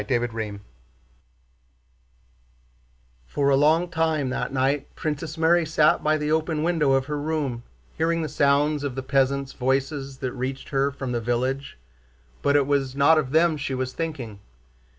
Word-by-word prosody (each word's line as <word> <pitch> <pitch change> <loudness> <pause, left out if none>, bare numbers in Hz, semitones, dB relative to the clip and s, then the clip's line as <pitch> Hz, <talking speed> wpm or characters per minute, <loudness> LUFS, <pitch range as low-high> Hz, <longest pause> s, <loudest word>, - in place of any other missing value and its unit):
CHAPTER 120 -2 -1
XII 105 -3 -4 2.7
For 140 - 0
a 140 - +5
long 155 +5 +3
time 160 -5 0
that - - -2
night 135 +2 -1
Princess 155 +1 -4
Mary 165 +1 +4
sat 155 -1 +2
by 155 0 +2
the 150 0 -2
open 160 -1 0
window 160 -5 +2
of 135 0 +2
her 150 0 -3
room 145 -6 -2 0.4
hearing 165 0 +1
the - - -2
sound 145 +1 +2
of 140 -3 -3
the 135 - -4
peasants' 135 0 +1
voices 135 +1 -1
that 130 -2 -4
reached 130 +1 -5
her 140 0 +1
from 135 -2 -5
the 120 -1 -1
village, 130 +4 -2 0.6
but 140 - +2
it 145 -1 +4
was 135 -2 0
not 150 +3 +5
of 140 -4 -2
them 160 0 +3
she 140 -2 -3
was 130 0 -3
thinking. 135 -11 -5
140 Hz, 160 wpm, -24 LUFS, 130-155 Hz, 2.7 s, a